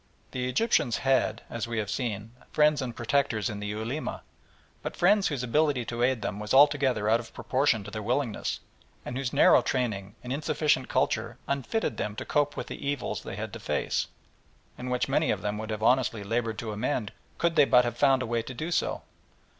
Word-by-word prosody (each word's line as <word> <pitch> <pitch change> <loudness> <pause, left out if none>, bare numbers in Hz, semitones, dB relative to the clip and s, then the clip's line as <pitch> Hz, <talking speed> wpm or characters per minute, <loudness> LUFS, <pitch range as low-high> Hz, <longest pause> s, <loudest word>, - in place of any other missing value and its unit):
The 125 0 -2
Egyptians 140 - +2
had, 130 -5 +2
as 115 0 -4
we 115 -1 -3
have 105 -2 -1
seen, 110 -3 -3 0.2
friends 150 -1 +4
and 120 -3 -4
protectors 120 -3 0
in 105 - -6
the 105 - -4
Ulema, 115 +8 -4 0.6
but - - -5
friends 200 +3 +4
whose 140 -5 -2
ability 140 0 +1
to 120 +1 -4
aid 125 -3 +2
them 95 - -3
was 105 +4 -1
altogether 135 -6 +4
out 115 +2 +4
of 115 - -11
proportion 130 -5 +1
to 105 - -9
their 110 - -4
willingness, 120 +1 -1 0.4
and 120 - -5
whose 130 -2 -2
narrow - - +6
training 110 -5 -2
and 125 +1 -3
insufficient 145 -2 +1
culture 115 +2 0
unfitted 140 - -1
them 105 -1 -3
to - - -5
cope 145 -1 +1
with - - -3
the - - -8
evils 140 -2 -2
they - - -7
had - - -5
to - - -6
face, - - -1 0.7
and 125 - -6
which 125 -1 0
many - - +1
of - - -1
them 105 0 -2
would 110 0 -5
have 110 0 -3
honestly 120 -3 +2
laboured 115 +1 -1
to 110 -1 -4
amend 110 0 -2 0.3
could 170 -1 +1
they 145 - +7
but 125 -2 +5
have 120 -1 -2
found 135 0 +3
a - - -3
way 115 0 0
to 130 +3 -8
do 160 +7 -4
so. - - 0
125 Hz, 205 wpm, -28 LUFS, 110-140 Hz, 0.7 s, they